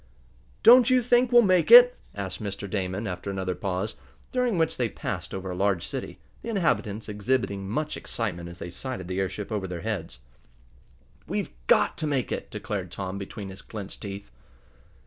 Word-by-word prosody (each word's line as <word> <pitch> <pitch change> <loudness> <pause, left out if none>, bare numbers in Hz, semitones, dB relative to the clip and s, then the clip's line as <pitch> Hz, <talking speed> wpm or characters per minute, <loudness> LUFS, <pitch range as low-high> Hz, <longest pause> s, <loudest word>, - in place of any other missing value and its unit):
"Don't 245 +1 +8
you 255 -1 +4
think 245 +1 +3
we'll 240 -1 +7
make 185 -4 +3
it?" 245 +1 +10 0.2
asked 95 -1 -5
Mr. 100 -1 -5
Damon, 95 +1 -2
after 90 0 -4
another 95 -1 -2
pause, 95 +3 -3 0.4
during 250 -6 +1
which 160 -1 +1
they 120 -3 0
passed - - -5
over 95 -1 -5
a - - -4
large 95 -2 +1
city, - - -5 0.2
the - - -6
inhabitants 110 - 0
exhibiting 105 -2 -1
much 150 +7 -2
excitement 90 -7 -3
as 85 - -10
they 85 - -7
sighted 105 -1 -5
the 95 +1 -2
airship 95 +3 -3
over 100 -3 -2
their 90 -2 -5
heads. 85 - -4 1.1
"We've - - -2 0.2
got - - +4
to 155 - 0
make 135 -4 -1
it!" - - -4
declared 95 -4 -4
Tom 95 +2 -5
between 100 0 -7
his 95 0 -9
clenched 105 -3 -8
teeth. 100 - -7
100 Hz, 175 wpm, -26 LUFS, 95-140 Hz, 1.1 s, it